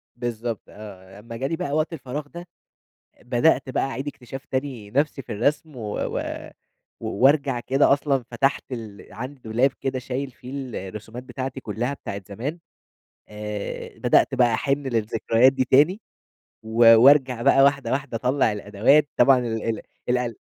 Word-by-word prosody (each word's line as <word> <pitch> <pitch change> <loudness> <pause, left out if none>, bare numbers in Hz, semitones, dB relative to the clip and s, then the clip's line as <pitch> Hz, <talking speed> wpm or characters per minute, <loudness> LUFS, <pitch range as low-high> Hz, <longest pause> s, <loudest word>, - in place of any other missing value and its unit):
بالضبط 120 -2 -4
آه، 95 -2 -12
لمّا 115 +2 -9
جالي 135 +6 -2
بقى 175 -3 -4
وقت 155 +2 0
الفراغ 145 0 -6
ده، 175 +4 -10 0.7
آآ، - - -23
بدأت 125 +4 +2
بقى - - 0
أعيد 135 +1 -4
اكتشاف 135 -1 -8
تاني 130 -7 -4
نفْسي 140 +1 0
في - - -11
الرسم 145 +7 -1
و 120 - -8 0.2
و - - -2 0.8
و - - -5
وأرجع 135 +2 +3
كده، 135 +4 +3
أصلًا 140 -2 0
فتَحت 135 +4 +1
ال 110 -5 -8
عندي 130 +5 -7
دولاب 120 +5 +2
كده 130 -1 -2
شايل 130 +2 -4
فيه 125 +1 -12 0.4
الرسومات 110 +5 -9
بتاعتي 130 +1 -5
كلّها، 120 +3 -3
بتاعة 100 -7 -6
زمان، 130 - -5 0.7
آآ، 105 -1 -6
بدأت 135 - +3
بقى 120 -3 +3
أحِن 140 +4 -1
للذكريات 115 +1 +2
دي 130 -1 0
تاني 150 - +4 0.6
و 115 +1 +6
وأرجَع 130 -1 +5
بقى 135 - +5
واحدة، 140 0 +2
واحدة 135 -3 -2
أطلّع 125 -1 +1
الأدوات، 105 +9 +2
طبعًا 130 +1 +6
ال 115 -3 -3 0.2
ال - - -10 0.3
القل 125 -2 0
125 Hz, 155 wpm, -24 LUFS, 115-140 Hz, 0.8 s, و